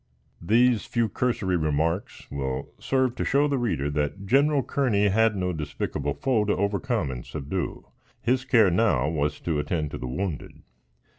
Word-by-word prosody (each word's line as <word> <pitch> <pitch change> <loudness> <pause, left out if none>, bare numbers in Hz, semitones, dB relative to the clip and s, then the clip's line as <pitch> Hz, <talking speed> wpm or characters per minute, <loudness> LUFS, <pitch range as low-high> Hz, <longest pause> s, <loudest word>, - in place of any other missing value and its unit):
These 115 +5 +3
few 115 -2 +1
cursory 100 -5 0
remarks 80 +4 -1
will 65 -2 -3
serve 130 -2 +1
to - - -1
show 140 +2 +3
the 140 -2 0
reader 85 - -1
that 75 +7 -2
General 140 +5 +3
Kearney 110 -8 +1
had 110 +2 +3
no 90 -1 -1
despicable 75 -2 -3
foe 120 - +1
to 105 - +1
overcome 100 - 0
and 60 -1 -6
subdue. 80 +3 -4 0.3
His 130 +2 +1
care 115 -7 +4
now 85 - +2
was 75 -2 -1
to 80 -3 -1
attend 75 0 -2
to - - -6
the 65 - -4
wounded. 85 +3 -4
95 Hz, 160 wpm, -26 LUFS, 75-120 Hz, 0.3 s, care